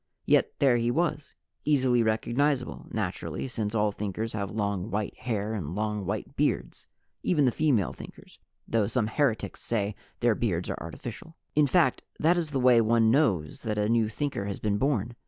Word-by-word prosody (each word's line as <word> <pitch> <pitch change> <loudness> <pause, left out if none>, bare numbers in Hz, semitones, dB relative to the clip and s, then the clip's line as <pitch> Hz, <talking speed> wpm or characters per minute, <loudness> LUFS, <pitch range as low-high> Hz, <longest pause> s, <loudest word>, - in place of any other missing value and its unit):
Yet - - +3
there 130 -4 +4
he 120 0 +1
was 155 +2 -1 0.3
easily 130 -5 +3
recognizable, 125 +5 0
naturally, - - -3
since 110 -3 -3
all 105 -1 +2
Thinkers 105 +2 -4
have 100 -2 -2
long 100 -2 -2
white 105 -1 -2
hair 110 -3 -2
and 90 -6 -4
long 105 -2 -2
white - - -4
beards. - - -1 0.3
(Even 150 -6 +2
the 125 - +4
female 125 - +1
Thinkers - - -13 0.3
though 110 -3 +1
some 115 0 0
heretics 115 +1 -1
say 105 -3 -1 0.3
their 120 -1 +4
beards 95 -6 -1
are - - -5
artificial.) 115 - -8 0.2
In 150 -1 +4
fact, 170 +4 +3 0.2
that 165 +3 +4
is 170 -3 -1
the 140 -2 -1
way 125 -2 +6
one 115 0 +4
knows 110 - +1
that 110 -2 -2
a 105 0 +1
new 115 -1 +2
Thinker 135 -3 -3
has 100 -1 -3
been 105 -1 -1
born. 120 -4 0
115 Hz, 175 wpm, -28 LUFS, 105-135 Hz, 0.3 s, way